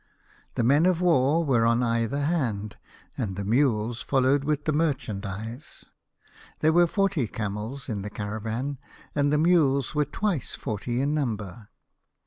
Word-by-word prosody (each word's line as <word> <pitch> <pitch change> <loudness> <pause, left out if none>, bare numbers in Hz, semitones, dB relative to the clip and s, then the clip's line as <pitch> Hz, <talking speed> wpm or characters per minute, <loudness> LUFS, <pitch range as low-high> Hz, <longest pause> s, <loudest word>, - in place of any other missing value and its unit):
The - - +1
men 145 +8 +4
of 180 -2 +2
war 165 -2 +3
were 125 -5 +3
on 115 +1 +3
either 115 +4 0
hand, 115 -10 -1 0.4
and 95 -4 -3
the 100 - -4
mules 115 0 +1
followed 135 +1 +2
with 150 0 -1
the 155 - +1
merchandise. 115 -6 -3 0.8
There 155 +1 +4
were 175 +1 +5
forty 195 - 0
camels 110 +6 -5
in 105 -5 -3
the 105 - -5
caravan, 110 +6 -4 0.3
and 145 -1 +1
the 150 - +3
mules 150 -6 +3
were 150 -1 +2
twice 175 - -2
forty 120 +3 -3
in 145 +2 0
number. 110 -7 -3
130 Hz, 145 wpm, -26 LUFS, 110-150 Hz, 0.8 s, were